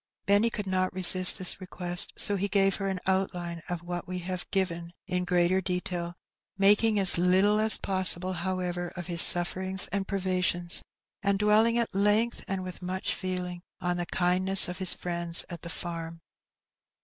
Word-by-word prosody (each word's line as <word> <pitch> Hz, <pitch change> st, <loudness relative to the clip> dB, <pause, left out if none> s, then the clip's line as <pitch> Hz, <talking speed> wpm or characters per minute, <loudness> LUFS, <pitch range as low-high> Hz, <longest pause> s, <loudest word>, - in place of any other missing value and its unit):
Benny 205 Hz, +3 st, +2 dB
could 210 Hz, -2 st, -6 dB
not 185 Hz, -1 st, -2 dB
resist 185 Hz, 0 st, +6 dB
this 185 Hz, 0 st, +1 dB
request, 180 Hz, -1 st, +2 dB
so 205 Hz, -, +3 dB
he 200 Hz, +1 st, -2 dB
gave 195 Hz, -1 st, +1 dB
her 195 Hz, -, -4 dB
an 190 Hz, -1 st, -4 dB
outline 180 Hz, -3 st, -3 dB
of 175 Hz, -1 st, -5 dB
what 175 Hz, 0 st, -7 dB
we 180 Hz, 0 st, -6 dB
have 180 Hz, 0 st, -7 dB
given 170 Hz, -3 st, -3 dB
in 180 Hz, -1 st, -3 dB
greater 180 Hz, +1 st, 0 dB
detail, 180 Hz, -1 st, -5 dB, 0.4 s
making 210 Hz, +2 st, +3 dB
as 190 Hz, -3 st, +3 dB
little 190 Hz, +4 st, +2 dB
as 220 Hz, 0 st, +5 dB
possible, 185 Hz, -1 st, +2 dB
however, 175 Hz, 0 st, -4 dB
of 175 Hz, -, -7 dB
his 170 Hz, -1 st, +2 dB
suflFerings 185 Hz, +2 st, +4 dB
and 195 Hz, 0 st, -3 dB
privations, 180 Hz, -2 st, -1 dB, 0.4 s
and 200 Hz, -1 st, 0 dB
dwelling 215 Hz, +3 st, +2 dB
at 235 Hz, -3 st, -2 dB
length, 210 Hz, +4 st, 0 dB
and 190 Hz, -1 st, -4 dB
with 185 Hz, 0 st, -9 dB
much 185 Hz, +1 st, -4 dB
feeling, 180 Hz, -1 st, -6 dB, 0.2 s
on 180 Hz, 0 st, -3 dB
the 175 Hz, -1 st, -5 dB
kindness 185 Hz, +2 st, +2 dB
of 180 Hz, +1 st, -8 dB
his 185 Hz, -2 st, 0 dB
friends 170 Hz, -1 st, -3 dB
at 170 Hz, -, -8 dB
the 170 Hz, -, -9 dB
farm. 165 Hz, -1 st, -7 dB
185 Hz, 170 wpm, -27 LUFS, 175-195 Hz, 0.4 s, resist